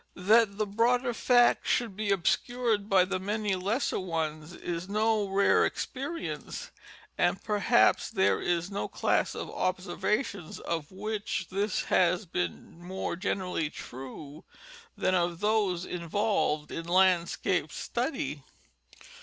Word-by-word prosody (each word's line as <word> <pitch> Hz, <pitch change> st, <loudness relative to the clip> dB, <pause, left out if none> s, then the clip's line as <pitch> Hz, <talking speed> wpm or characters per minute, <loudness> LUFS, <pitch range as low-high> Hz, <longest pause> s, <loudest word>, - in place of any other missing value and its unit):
That 205 Hz, +2 st, +4 dB
the 215 Hz, -, +1 dB
broader 240 Hz, +4 st, +1 dB
fact 245 Hz, +1 st, +4 dB
should 230 Hz, -6 st, +1 dB
be 210 Hz, 0 st, -2 dB
obscured 220 Hz, +3 st, +1 dB
by 185 Hz, -2 st, +5 dB
the 185 Hz, 0 st, -2 dB
many 205 Hz, +1 st, -1 dB
lesser 205 Hz, +8 st, -1 dB
ones 160 Hz, -3 st, -3 dB
is 175 Hz, +2 st, -5 dB
no 215 Hz, 0 st, +1 dB
rare 195 Hz, +1 st, +4 dB
experience, 290 Hz, +5 st, -4 dB, 0.5 s
and -, -, +2 dB
perhaps 215 Hz, +3 st, +3 dB
there 190 Hz, -4 st, +2 dB
is 175 Hz, +2 st, -1 dB
no 200 Hz, -, -2 dB
class -, -, 0 dB
of -, -, -5 dB
observations 195 Hz, -, -2 dB
of 165 Hz, -2 st, -4 dB
which 205 Hz, -1 st, -3 dB
this 200 Hz, +1 st, 0 dB
has 185 Hz, +3 st, +2 dB
been 90 Hz, -, -4 dB
more 185 Hz, 0 st, -3 dB
generally 180 Hz, -3 st, -2 dB
true 140 Hz, +4 st, -9 dB, 0.5 s
than 185 Hz, -, +1 dB
of 175 Hz, -2 st, +1 dB
those 205 Hz, -4 st, +1 dB
involved 170 Hz, -3 st, -1 dB
in 165 Hz, -, -5 dB
landscape 180 Hz, -1 st, +2 dB
study. -, -, -3 dB
190 Hz, 120 wpm, -29 LUFS, 175-215 Hz, 0.5 s, by